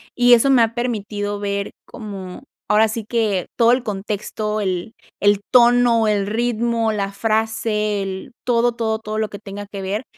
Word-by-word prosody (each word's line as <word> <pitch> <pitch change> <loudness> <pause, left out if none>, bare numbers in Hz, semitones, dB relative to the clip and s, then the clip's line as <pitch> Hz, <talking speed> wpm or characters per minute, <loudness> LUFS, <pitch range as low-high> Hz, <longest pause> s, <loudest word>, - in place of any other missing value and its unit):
y 245 0 +6
eso 240 +3 +5
me 255 -3 +5
ha 225 0 +2
permitido 205 -4 -3
ver 200 0 -2
como, 195 -1 -8 0.3
ahora 215 +1 +5
sí 220 +1 -4
que 215 -5 0
todo 235 +1 +5
el 250 - 0
contexto, 210 +1 -3
el 185 +2 -3 0.2
el 205 0 +3
tono, 240 -2 +5
el 205 -2 +1
ritmo, 230 0 0
la 200 -1 -2
frase, 215 -1 0
el 190 +4 -6
todo, 240 0 +2
todo, 220 -2 -1
todo 215 -1 -5
lo 215 -1 -1
que 205 - -8
tenga 205 0 -8
que 200 -1 -7
ver, 200 +5 -3
215 Hz, 170 wpm, -20 LUFS, 205-230 Hz, 0.3 s, y